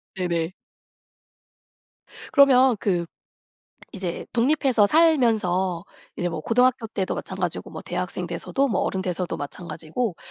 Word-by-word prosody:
네네. 175 -2 -1 1.8
그러면 265 -3 +6
그 175 -4 0 0.9
이제 185 -3 -4
독립해서 250 -3 +3
살면서 215 - +2 0.3
이제 175 - -1
뭐 165 -2 -4
고등학교 245 +3 +2
때도 195 -3 -2
마찬가지고 - - -4
뭐 - - -7
대학생 - - -4
돼서도 275 +1 -1
뭐 190 - 0
어른 190 - -1
돼서도 180 -1 -3
마찬가지고 165 - -4
195 Hz, 275 characters per minute, -24 LUFS, 175-250 Hz, 1.8 s, 그러면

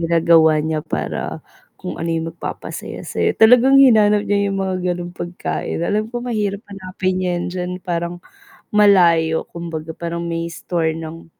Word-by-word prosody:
ginagawa 165 -1 +4
niya 155 -1 -1
para, - - -4 0.3
kung - - -7
ano 165 - -2
yung 165 0 -2
magpapasaya - - -7
sa - - -5
'yo, - - +1
talagang 250 +4 +6
hinanap 215 -6 +5
niya 200 0 +1
yung 195 - -2
mga 190 -1 -2 0.2
gano'ng 175 0 -7
pagkain, 175 -1 -4
alam 215 +3 -1
ko 240 +1 -5
mahirap 210 -3 -2
hanapin 185 -1 -3
'yan 175 -1 -1
diyan, 180 0 -3
parang 170 0 -3 0.5
malayo, 170 -6 +4
kumbaga 165 -2 -6
parang 170 0 -4
may 170 0 -3
store 165 -1 -2
ng, 165 0 -8
175 Hz, 155 wpm, -19 LUFS, 165-205 Hz, 0.5 s, talagang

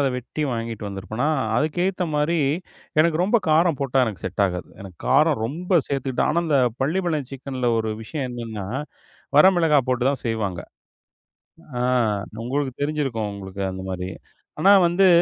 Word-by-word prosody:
அத 140 - +3
வெட்டி 125 +5 -4
வாங்கிட்டு 115 -3 -4
வந்திருப்பேனா. 105 +7 -3 0.3
அதுக்கு 155 +5 0
ஏத்த 185 -1 -1
மாரி, 150 +3 +1 0.6
எனக்கு 160 0 +3
ரொம்ப 210 +6 +3
காரம் 160 0 +4
போட்டா, 135 -1 0
எனக்கு 105 -7 -5
செட் 95 +2 -1
ஆகாது. 90 -1 -3
எனக்குக் 95 -4 -11
காரம் - - +4
ரொம்ப 175 +6 +1
சேர்த்துக்கிட்டா 135 -2 -1
ஆனா, 170 +3 +2
அந்தப் 130 -7 +2
பள்ளிபாளையம் 155 -3 0
சிக்கன்ல 130 -2 -3
ஒரு 110 -1 -1
விஷயம் 135 +5 -4
என்னன்னா, 115 -4 -6 0.7
வர 150 - +9
மிளகாய் 150 -6 +3
போட்டுத்தான் 130 +2 +1
செய்வாங்க. 105 -6 -2 1.2
அ, - - +1 0.6
உங்களுக்குத் 135 +1 -2
தெரிஞ்சிருக்கும். 135 -8 -1
உங்களுக்கு 100 0 -7
அந்த 95 0 -6
மாரி. 90 0 -4 0.5
ஆனா, 195 +4 +7
வந்து 185 +2 +4
135 Hz, 145 wpm, -23 LUFS, 110-155 Hz, 1.2 s, வர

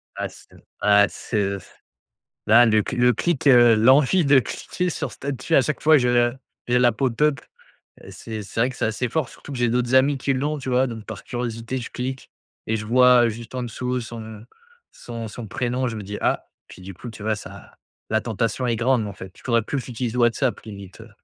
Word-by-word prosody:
Ah - - -3
c'est - - -17 0.3
ah 105 0 +5
c'est, 110 - -5
heu, 100 -1 0
s 95 - -15 0.8
là 115 +3 +7
le 110 -2 +3
cl - - -5
le 125 0 +5
clic, 165 +4 -1
heu, 120 -3 +7
l'envie 135 +9 +4
de 140 -1 +6
cliquer 180 +7 -3
sur - - -4
statut 140 +3 -4
à - - +7
chaque 150 - -3
fois, 155 0 +6
je 125 -1 +1
le 120 0 +2 0.3
j'ai 125 0 +2
l'app 120 -3 +2
au 130 - +3
top. 150 +4 +1 0.6
Heu, - - -12
c'est 110 +3 -7
c'est 100 - -5
vrai 125 - +3
que 125 - -11
c'est - - -1
assez 110 +3 -1
fort, 145 +1 -1
surtout 145 - -11
que 130 - -5
j'ai 120 -1 +2
d'autres 125 +1 0
amis 135 +1 +4
qui 135 +1 0
l'ont 145 +3 -1
tu 130 - -7
vois? 130 +1 +2
Donc 115 -3 -8
par 110 -3 -8
curiosité, 120 +1 -4
je 120 - -7
clique 130 +1 -5 0.4
et 110 - 0
je 105 - -5
vois, 125 +1 +5
heu, - - +3
juste 115 +2 -10
en-dessous 125 0 -3
son 110 -2 -9 0.5
son 115 -2 -7
son 110 +2 -8
prénom. 125 +4 -2
Je 115 - -5
me 105 - -6
dis: 105 +1 -6
«Ah» - - 0 0.2
puis - - -13
du 95 +1 -8
coup, 120 +7 -9
tu 110 - -11
vois? 110 0 0
Ça - - -11 0.4
la 110 0 +2
tentation 115 +2 -2
est 115 -2 0
grande 120 -2 +1
en 100 - -6
fait, 95 -1 -10
je - - -17
devrais 115 -2 +2
plus 140 - -3
que 125 - -5
j'utilise 120 -1 -4
WhatsApp 120 +1 +1
limite, 100 -2 -11
heu. 115 +1 -13
120 Hz, 230 wpm, -23 LUFS, 110-130 Hz, 0.8 s, là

